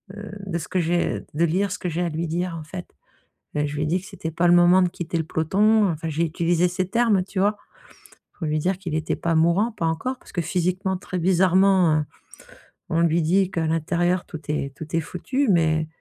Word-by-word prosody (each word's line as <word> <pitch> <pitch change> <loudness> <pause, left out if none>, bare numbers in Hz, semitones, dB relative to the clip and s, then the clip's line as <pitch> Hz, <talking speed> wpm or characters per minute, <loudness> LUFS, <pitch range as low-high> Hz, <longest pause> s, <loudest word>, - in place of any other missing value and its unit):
heu, 210 -1 -8
de 175 -3 -2
ce 160 - -6
que 185 - -1
j'ai 175 +1 0
de 165 +3 +2
lire 190 +4 0
ce - - -4
que 180 - -3
j'ai 170 +1 -2
à 175 - -1
lui 165 +2 -3
dire, 175 +2 -2
en - - -8
fait. 180 +3 -7 0.7
Ben, 150 0 0
je 145 - -6
lui 150 - -1
ai - - 0
dit 175 +4 +1
que 190 - -13
c'était 180 -6 -6
pas 170 +2 +1
le 175 - +6
moment 175 +2 +6
de 180 - +2
quitter 175 -1 -4
le 160 - 0
peloton. 200 +7 +2
Enfin, 160 0 -4
j'ai 160 +2 0
utilisé 170 +1 +1
ses 180 0 -2
termes, 225 -4 +2
tu 195 0 -5
vois, 205 +2 +2 0.8
pour 165 - -6
lui 155 0 0
dire 185 +4 0
qu'il 175 -5 -5
était 160 0 -1
pas 165 -1 -1
mourant, 170 +8 +3
pas 170 -6 -3
encore, 255 +11 -2
parce - - -16
que, 175 - 0
physiquement, 185 +3 -1
très 185 0 -5
bizarrement, 185 -1 +4
heu, - - -5 0.8
on 165 +1 +1
lui 170 0 +3
dit 185 +4 +2
qu'à 165 -3 -1
l'intérieur, 175 +3 0
tout 160 - -8
est 140 -2 -2
tout 160 +2 -6
est 165 - +2
foutu, 260 - -2
mais 160 -3 +2
175 Hz, 230 wpm, -23 LUFS, 160-190 Hz, 0.8 s, le